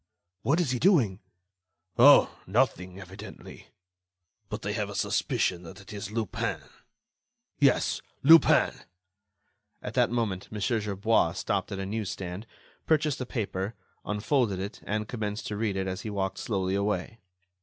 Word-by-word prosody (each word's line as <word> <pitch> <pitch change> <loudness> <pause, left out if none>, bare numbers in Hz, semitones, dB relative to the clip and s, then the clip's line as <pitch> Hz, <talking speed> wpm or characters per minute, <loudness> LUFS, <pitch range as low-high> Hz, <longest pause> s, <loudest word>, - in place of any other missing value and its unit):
"What 145 +9 +2
is 165 -8 +1
he 125 - -1
doing?" 125 - +3 0.8
"Oh! - - +7
nothing, 95 -4 0
evidently.... 95 +3 -11 0.8
But - - -5
I - - -1
have - - -2
a - - -7
suspicion 90 -2 0
that 90 +3 -11
it 100 +1 -12
is 100 -1 -5
Lupin—yes, 110 -1 -3 0.2
Lupin!" 160 +4 +7 1.1
At - - -5
that - - +3
moment, 110 -6 -2
Mon. 105 - -5
Gerbois 105 -4 +1
stopped 100 +2 -2
at 100 - -3
a 95 - -3
news 105 0 -3
stand, 95 +4 -6 0.4
purchased 150 -4 +2
a 130 - -4
paper, 100 -3 -3 0.3
unfolded 105 -1 0
it 100 +2 -6
and 105 +1 -2
commenced 105 -2 -4
to 105 - -3
read 105 -2 -1
it 95 - -1
as 95 -1 -4
he 110 - -5
walked 95 -2 -2
slowly 95 -4 -1
away. 100 +2 -1
105 Hz, 145 wpm, -28 LUFS, 95-115 Hz, 1.1 s, Oh